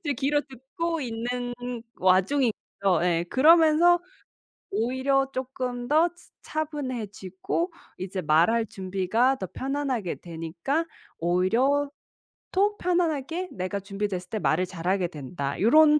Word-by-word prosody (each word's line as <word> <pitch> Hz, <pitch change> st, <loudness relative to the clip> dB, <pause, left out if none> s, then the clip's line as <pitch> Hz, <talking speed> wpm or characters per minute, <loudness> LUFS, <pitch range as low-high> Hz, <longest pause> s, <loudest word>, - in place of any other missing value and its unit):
이제 295 Hz, -6 st, -1 dB
귀로 280 Hz, +3 st, +1 dB
듣고 320 Hz, +6 st, -4 dB
있는 245 Hz, 0 st, -3 dB, 0.4 s
와중이죠. 195 Hz, +7 st, +3 dB, 0.5 s
예. 170 Hz, -1 st, +2 dB
그러면서 325 Hz, +4 st, +6 dB, 0.7 s
오히려 260 Hz, +5 st, +1 dB
쪼끔 250 Hz, -2 st, -4 dB
더 315 Hz, +4 st, +5 dB
츠 350 Hz, -, -21 dB
차분해지고 255 Hz, -, -3 dB, 0.3 s
이제 185 Hz, 0 st, -3 dB
말 160 Hz, +3 st, +4 dB
할 230 Hz, -1 st, +1 dB
준비가 195 Hz, +7 st, +1 dB
더 190 Hz, -, -4 dB
편안하게 265 Hz, -8 st, -2 dB
되니까 170 Hz, -, -3 dB, 0.3 s
오히려 230 Hz, -, +2 dB, 0.6 s
또 410 Hz, +2 st, +2 dB
편안하게 345 Hz, -1 st, 0 dB
내가 185 Hz, +2 st, -3 dB
준비됐을 195 Hz, -2 st, -4 dB
때 215 Hz, -, -2 dB
말을 180 Hz, -1 st, +2 dB
잘하게 180 Hz, +1 st, -1 dB
된다. 140 Hz, -2 st, -5 dB
요런 300 Hz, +7 st, +6 dB
245 Hz, 255 characters per minute, -26 LUFS, 185-290 Hz, 0.7 s, 그러면서